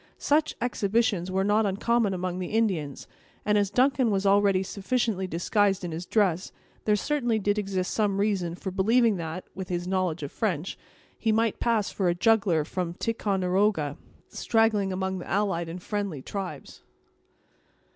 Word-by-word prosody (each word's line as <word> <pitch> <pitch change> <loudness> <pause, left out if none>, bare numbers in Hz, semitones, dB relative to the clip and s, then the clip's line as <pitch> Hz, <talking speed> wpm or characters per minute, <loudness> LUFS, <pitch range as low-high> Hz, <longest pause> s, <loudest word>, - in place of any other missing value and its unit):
Such 305 +1 +1
exhibitions 215 -5 0
were 190 +1 0
not 210 +1 +2
uncommon 215 +2 +1
among 185 -1 -3
the 180 - -3
Indians, 185 -11 -1 0.4
and 210 - +2
as 205 -2 +2
Duncan 255 +2 +3
was 200 -1 0
already 195 -1 +4
sufficiently 200 0 -1
disguised 195 +3 +1
in 170 - -4
his 170 +3 -5
dress, 190 -4 +1 0.3
there 210 - +4
certainly 240 0 0
did 205 0 0
exist 190 -3 -2
some 205 -3 +1
reason 190 -5 0
for 190 +1 -5
believing 220 +3 +3
that, 165 +2 -5
with 190 -1 -7
his 175 0 -2
knowledge 185 -4 -1
of 140 - -5
French, 185 -6 -2 0.4
he 225 - +1
might 225 0 +1
pass 225 -4 +1
for 190 -3 0
a 175 - +1
juggler 190 -6 +3
from 175 0 -3
Ticonderoga, 190 -7 0 0.3
straggling 220 -4 +1
among 190 0 -2
the - - -9
allied 190 -5 0
and 175 +2 -7
friendly 200 -10 -3
tribes. 185 -8 -6
195 Hz, 155 wpm, -27 LUFS, 180-215 Hz, 0.4 s, already